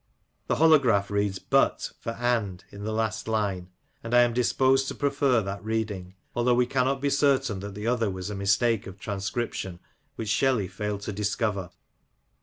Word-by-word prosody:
The -, -, +1 dB
holograph 130 Hz, -11 st, +4 dB
reads 100 Hz, -1 st, 0 dB
but -, -, +1 dB
for 115 Hz, -, -4 dB
and 115 Hz, -7 st, -1 dB
in 100 Hz, +1 st, -8 dB
the 110 Hz, -, -2 dB
last 110 Hz, 0 st, -2 dB
line; 100 Hz, -5 st, -1 dB, 0.3 s
and 115 Hz, +1 st, -1 dB
I 120 Hz, -, +8 dB
am 120 Hz, -1 st, +1 dB
disposed 130 Hz, +2 st, +2 dB
to -, -, -4 dB
prefer 140 Hz, -5 st, +2 dB
that 100 Hz, +1 st, -5 dB
reading, 105 Hz, -4 st, -3 dB, 0.2 s
although 120 Hz, +1 st, +3 dB
we 125 Hz, 0 st, +3 dB
cannot 130 Hz, +1 st, 0 dB
be 140 Hz, 0 st, +1 dB
certain 135 Hz, -7 st, +2 dB
that 100 Hz, 0 st, -7 dB
the 105 Hz, +1 st, -6 dB
other 115 Hz, -2 st, +1 dB
was 95 Hz, +1 st, -5 dB
a -, -, -4 dB
mistake 100 Hz, +3 st, +1 dB
of 95 Hz, 0 st, -9 dB
transcription 100 Hz, -3 st, -3 dB, 0.4 s
which 110 Hz, -2 st, -4 dB
Shelley 115 Hz, -3 st, +2 dB
failed 105 Hz, +2 st, -4 dB
to 105 Hz, -, -4 dB
discover. 105 Hz, -2 st, -1 dB
110 Hz, 175 wpm, -27 LUFS, 100-120 Hz, 0.4 s, I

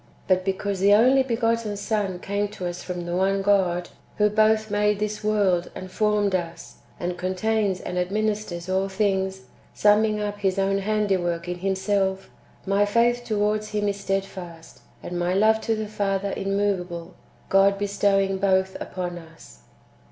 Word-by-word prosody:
But 185 Hz, -1 st, +3 dB
because 195 Hz, +1 st, -2 dB
the 200 Hz, +2 st, +6 dB
only 255 Hz, +5 st, +5 dB
begotten 230 Hz, -4 st, 0 dB
Son 205 Hz, -3 st, -1 dB
came 200 Hz, +3 st, -2 dB
to 205 Hz, -3 st, -7 dB
us 175 Hz, 0 st, -4 dB
from 175 Hz, -1 st, -5 dB
the 175 Hz, 0 st, -3 dB
one 195 Hz, +1 st, +1 dB
God, 180 Hz, -3 st, +2 dB, 0.3 s
who 210 Hz, 0 st, +3 dB
both 215 Hz, 0 st, +2 dB
made 210 Hz, 0 st, +2 dB
this 210 Hz, +1 st, -3 dB
world 200 Hz, -5 st, +1 dB
and 185 Hz, 0 st, -8 dB
formed 210 Hz, -2 st, +1 dB
us, 170 Hz, -2 st, -4 dB, 0.2 s
and 175 Hz, 0 st, -3 dB
contains 190 Hz, +1 st, 0 dB
and 180 Hz, -, -4 dB
administers 200 Hz, -2 st, -2 dB
all 190 Hz, +1 st, 0 dB
things, 190 Hz, -1 st, 0 dB, 0.3 s
summing 210 Hz, +1 st, +3 dB
up 205 Hz, 0 st, -3 dB
His 195 Hz, -1 st, 0 dB
own 195 Hz, 0 st, +1 dB
handiwork 190 Hz, -5 st, 0 dB
in 175 Hz, 0 st, -4 dB
Himself, 190 Hz, 0 st, -1 dB, 0.3 s
my 200 Hz, +1 st, +2 dB
faith 235 Hz, +3 st, +2 dB
towards 215 Hz, -1 st, 0 dB
Him 210 Hz, -1 st, 0 dB
is 200 Hz, 0 st, -3 dB
stedfast, 190 Hz, -4 st, -5 dB, 0.2 s
and 175 Hz, 0 st, -4 dB
my 175 Hz, +1 st, 0 dB
love 220 Hz, +2 st, +4 dB
to 225 Hz, -, 0 dB
the 215 Hz, 0 st, -3 dB
Father 200 Hz, -1 st, -1 dB
im 195 Hz, 0 st, -2 dB
moveable, 180 Hz, -4 st, -2 dB, 0.4 s
God 195 Hz, +1 st, +4 dB
bestowing 195 Hz, -1 st, +1 dB
both 190 Hz, -1 st, +1 dB
upon 175 Hz, -1 st, -5 dB
us." 160 Hz, -, -16 dB
195 Hz, 160 wpm, -24 LUFS, 185-210 Hz, 0.4 s, the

